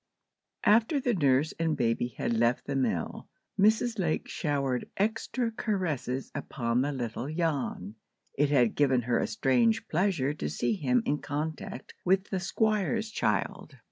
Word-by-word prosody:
AFTER 230 +7 +4
the 250 -3 +1
nurse 145 -3 +2
and 165 -2 +1
baby 115 0 +1
had - - -1
left 115 +2 +2
the 140 - -3
mill, 115 -11 -2 0.3
Mrs. 220 +2 +3
Lake 165 -4 0
showered 140 -5 -1
extra 230 +3 0
caresses 170 - -2
upon 120 -4 -1
the 145 +2 0
little 125 +1 -4
Jan. 150 - -2 0.4
It 145 +1 +2
had 125 -6 +3
given 130 -4 +2
her 120 0 +1
a - - 0
strange 120 -4 +2
pleasure 160 -5 +1
to 75 - -4
see 115 +11 0
him 125 -1 +1
in 145 +1 0
contact 150 -2 -5
with 190 +2 +1
the 190 - 0
Squire's 215 +3 0
child. - - -1
145 Hz, 145 wpm, -29 LUFS, 125-195 Hz, 0.4 s, AFTER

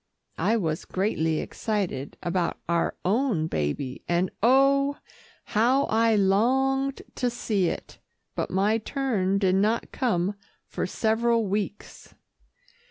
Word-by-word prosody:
I 230 - +2
was 160 -6 -2
greatly 160 -5 0
excited 190 -11 -3
about 175 0 -1
our 170 0 0
own 210 - +1
baby, 125 - -3
and 175 +2 +1
oh! 275 +4 +4 0.5
how 245 +6 +2
I 225 0 +3
longed 265 +7 +2
to 250 - 0
see 215 -6 0
it, - - -5 0.3
but - - -2
my 205 +4 +2
turn 215 -6 0
did 190 -2 +2
not 210 +4 +1
come 205 -7 0 0.3
for - - -3
several 230 +1 +1
weeks. 205 +1 -4
210 Hz, 115 wpm, -26 LUFS, 185-240 Hz, 0.5 s, oh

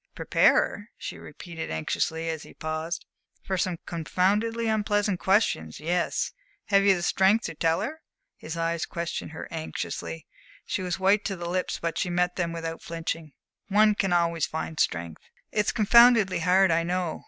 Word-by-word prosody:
"Prepare - - +4
her?" 205 +2 0
she - - -7
repeated 165 +2 -8
anxiously, 160 - -2
as 160 -2 -3
he - - -13
paused. 155 +2 -4 0.4
"For 190 - -2
some 180 -1 -1
confoundedly 205 +8 0
unpleasant 205 -3 +1
questions! 190 - +1
Yes. 170 +3 0 0.4
Have 200 -1 +5
you 195 -1 +5
the 175 - -4
strength 195 +5 +3
to - - -4
tell 165 +1 +1
her?" 315 +3 -5 0.3
His 160 +2 -7
eyes 165 0 -1
questioned 170 0 -4
her 160 - -8
anxiously. 160 0 -5 0.4
She - - -2
was 180 0 -2
white 195 +2 +3
to 195 - -1
the 175 -1 -6
lips, 180 +1 -1
but 165 -1 -2
she 180 - -1
met 180 0 +1
them 170 -2 -1
without 165 -1 -5
flinching. 165 -2 -5 0.3
"One 210 +1 +5
can 195 -2 0
always 170 -2 +2
find 160 0 -5
strength." 85 -2 -1 0.3
"It's 210 0 +1
confoundedly 230 -3 +5
hard, 185 +2 +4
I 165 +1 +3
know." 175 -1 -2
175 Hz, 165 wpm, -26 LUFS, 165-195 Hz, 0.4 s, Have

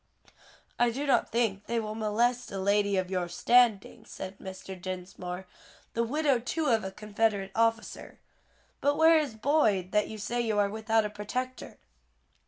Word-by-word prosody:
"I 240 - +4
do 270 +5 -3
not 275 - +2
think 215 -4 -1
they 235 0 0
will 215 -1 -4
molest 230 +3 0
a 195 - -4
lady 200 +1 +2
of 185 0 -1
your 180 -2 -1
standing," 235 +2 +3
said 190 +1 -8
Mr. 190 0 -8
Dinsmore, 180 0 -6 0.5
"the 230 - 0
widow 280 +1 +1
too 310 +7 -2
of 220 -2 +2
a 190 - -3
Confederate 205 -1 -1
officer. 230 +1 -1 0.6
But 285 +1 +1
where 320 0 +6
is 285 -7 -3
Boyd, 215 - +2
that 210 0 +2
you 220 - -7
say 235 +4 -2
you 220 -3 -1
are 200 -1 +2
without 220 0 +1
a - - -2
protector?" 255 +5 -5
215 Hz, 165 wpm, -29 LUFS, 195-240 Hz, 0.6 s, where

